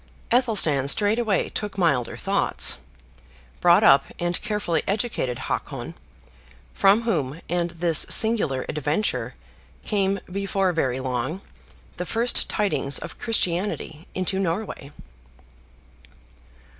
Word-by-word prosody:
Athelstan 200 - +3
straightway 210 +5 +2
took 205 -2 -5
milder 140 -10 +1
thoughts; - - +1 0.8
brought - - +5
up, - - +6
and 175 0 -2
carefully 210 -6 -1
educated 200 - -1
Hakon; - - -4 0.8
from 200 +4 +4
whom, 160 - -1
and 175 0 -1
this 170 -1 +2
singular 210 - +3
adventure, 150 +7 -2 0.5
came, 200 -1 0
before 195 0 -1
very 130 -6 0
long, 130 +7 -3 0.6
the 180 - -3
first 235 +2 0
tidings 195 -9 0
of - - -7
Christianity 180 -6 -2
into 185 +1 -1
Norway. 170 -5 -3
180 Hz, 100 wpm, -24 LUFS, 150-210 Hz, 0.8 s, up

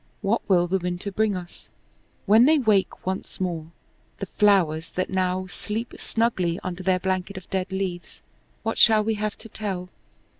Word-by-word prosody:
What 210 +4 +2
will 175 -2 +5
the 190 +2 0
winter 180 +3 -3
bring 210 0 +1
us? 175 -1 -9 0.6
When 220 +4 +7
they 315 +2 +5
wake 215 -8 +1
once 190 +1 -4
more, 170 -4 -3 0.5
the - - -4
flowers 170 -6 +2
that 185 - -3
now 185 0 0
sleep 215 +5 -5
snugly 190 -7 0
under 185 0 -4
their 185 0 +2
blanket 190 +1 -2
of 185 - -9
dead 190 -1 -1
leaves, 190 -2 -4 0.4
what 225 0 -1
shall 215 -2 +6
we 225 +1 +1
have 210 0 -3
to 225 - -12
tell? 195 -4 -4
190 Hz, 165 wpm, -25 LUFS, 180-215 Hz, 0.6 s, When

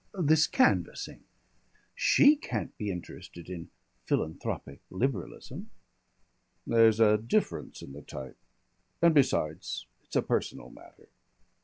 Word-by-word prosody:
"This 155 -1 +4
canvassing. 255 -1 +1 0.7
She - - +5
can't 125 - -5
be 105 - -4
interested 90 -1 -8
in 85 -2 -7 0.4
philanthropic 70 -3 -3
Liberalism." 100 - -4 1.0
"There's 115 -1 +4
a 105 -1 +5
difference 115 +2 -2
in 70 - -10
the 75 - -9
type. 65 -2 -9 0.6
And 170 -1 +5
besides, 80 - +1 0.2
it's - - -12
a - - +3
personal - - -2
matter." - - -17
110 Hz, 110 wpm, -29 LUFS, -, 1.0 s, She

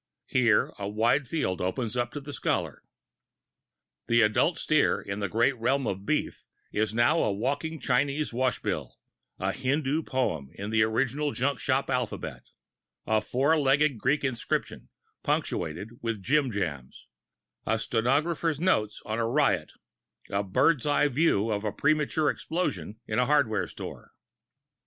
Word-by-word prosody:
Here 120 -5 +3
a 100 - -3
wide 115 +6 +2
field 115 - -1
opens 110 +6 -2
up 120 -1 0
to 145 - -4
the 145 0 -8
scholar. - - -1 1.3
The 115 0 +4
adult 110 +11 +2
steer 155 -1 +2
in 100 +1 -5
the 100 -2 -2
great 120 +6 +2
realm 135 +4 +1
of 95 -1 -4
beef - - -1 0.3
is 110 0 0
now 120 +8 +3
a 110 - +2
walking 145 +10 -2
Chinese 140 +2 0
wash 130 +1 0
bill, - - -3 0.4
a - - -1
Hindoo 140 +3 0
poem 125 - -2
in 100 +2 -5
the 110 0 +3
original 135 +6 +1
junk 140 +2 0
shop 135 0 0
alphabet, 125 -3 -3 0.6
a 110 -1 +2
four 140 +8 +2
legged 140 -2 +3
Greek 140 +7 +1
inscription, 130 -4 -2 0.3
punctuated 85 +7 -2
with 115 -4 -3
jim 140 +2 +2
jams, 80 - -4 0.6
a 110 - +2
stenographer's 145 +8 0
notes 110 - +1
of 110 +1 -2
a - - +1
riot, 140 +4 +1 0.6
a 100 - +1
bird's 125 - +2
eye 145 0 +3
view 120 -6 +2
of 105 0 -1
a 105 - -1
premature 150 +4 +1
explosion 110 - -3
in 110 - -1
a 125 - +2
hardware 110 - +2
store. - - -9
125 Hz, 145 wpm, -28 LUFS, 110-145 Hz, 1.3 s, The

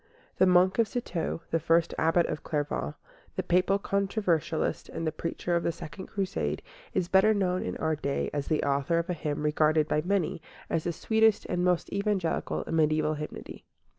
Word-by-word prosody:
The 185 - +5
monk 185 +3 +4
of 230 - +4
Citeaux, 180 -8 -3
the 165 - +2
first 165 +1 +2
Abbot 165 +2 +3
of - - -3
Clairvaux, 145 - -2 0.4
the - - -1
Papal 185 +3 +3
controversialist 195 -5 -1
and 165 - -4
the 155 - +1
preacher 170 +2 -2
of 170 - +2
the 170 - 0
Second 165 +3 -9
Crusade, 195 -1 -2 0.3
is 175 - +1
better 195 +4 +5
known 185 -2 +1
in - - -4
our 160 0 0
day 140 -2 -2
as 145 -1 -2
the 155 - +1
author 140 +4 +1
of 170 +2 -1
a - - 0
hymn 150 -3 -3
regarded 155 0 +3
by 150 - +1
many 180 -3 0 0.3
as 160 - 0
the 175 - +1
sweetest 220 +4 +2
and 180 - -1
most 180 -1 +1
Evangelical 200 -4 -1
in - - -6
mediæval 155 0 +2
hymnody. 150 0 -7
170 Hz, 185 wpm, -28 LUFS, 155-190 Hz, 0.4 s, The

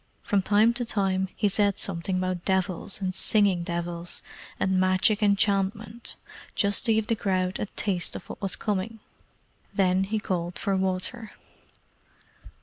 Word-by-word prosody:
From 200 -2 +2
time 210 +4 +4
to 245 +1 -2
time 190 -4 0
he 210 - +2
said 200 0 +2
something 185 0 -1
about 185 -1 -2
devils 190 0 0
and 185 -1 -1
singing 195 -2 +3
devils, 170 0 -3 0.4
and 190 -1 +2
magic 185 +4 +3
enchantment, 205 +2 0 0.4
just 200 +4 +2
to 225 - +5
give 220 -1 +1
the 230 +1 0
crowd 185 -3 -1
a - - -2
taste 185 -4 +1
of - - -8
what - - -9
was 195 -2 0
coming. 210 +2 -2 0.8
Then 190 -1 +3
he 215 +3 -1
called 180 -4 -2
for 195 - 0
water. 190 +5 -2
195 Hz, 145 wpm, -27 LUFS, 185-210 Hz, 0.8 s, to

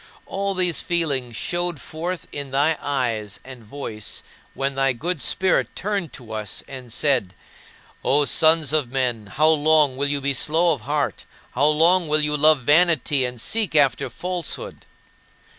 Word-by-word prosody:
And - - -24
all 195 0 -2
these 180 -3 +1
feelings 140 -9 -1
showed 175 +3 -2
forth 170 +5 -6
in 140 -1 -6
my 145 +4 +2
eyes 115 -7 -2
and 130 -3 -11
voice 110 -2 -6 0.3
when 135 0 -2
thy 135 0 +1
good 165 +5 -3
Spirit 190 +8 0
turned 200 -5 -3
to 120 -4 -11
us 110 -2 -4
and 130 -3 -10
said, 120 - 0 0.7
"O 145 +1 +3
sons 155 -1 +3
of 145 -6 +1
men, 125 -5 -2
how 150 +10 +2
long 155 -3 +3
will 140 +1 +1
you 145 0 0
be 140 0 0
slow 160 +6 +2
of 140 - -7
heart, 145 -1 -2 0.3
how 145 - +2
long 165 +3 +4
will 155 0 +3
you 150 0 +1
love 150 -1 +4
vanity, 150 -2 +3
and 125 -1 -6
seek 215 - -1
after 140 -5 +2
falsehood?" 180 -3 -5
145 Hz, 160 wpm, -22 LUFS, 130-165 Hz, 0.7 s, long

